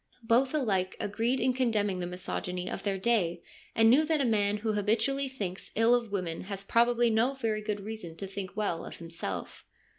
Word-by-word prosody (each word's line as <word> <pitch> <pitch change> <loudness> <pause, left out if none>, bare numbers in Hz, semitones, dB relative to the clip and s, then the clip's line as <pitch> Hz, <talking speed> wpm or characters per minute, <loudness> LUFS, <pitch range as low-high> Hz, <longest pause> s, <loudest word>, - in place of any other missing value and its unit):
Both 250 +5 +3
alike 195 -10 0
agreed 230 +6 0
in 255 +1 +2
condemning 215 -7 +1
the 175 - -2
misogyny 180 0 -3
of - - -4
their 200 -2 -1
day 185 -5 +1 0.3
and 225 0 +5
knew 265 +7 +6
that 315 -1 +1
a 275 - +2
man 210 -3 +2
who 215 +1 -1
habitually 235 +7 +1
thinks 195 -8 -4
ill 225 +2 +5
of 235 -3 +1
women 180 -4 -3
has 195 0 -5
probably 235 +2 +3
no 235 +5 +2
very 225 -5 -1
good 210 -1 -3
reason 200 -6 -7
to 195 - -6
think 195 0 -7
well 175 -6 -1
of - - -8
himself. 165 - -6
215 Hz, 190 wpm, -30 LUFS, 190-235 Hz, 0.3 s, knew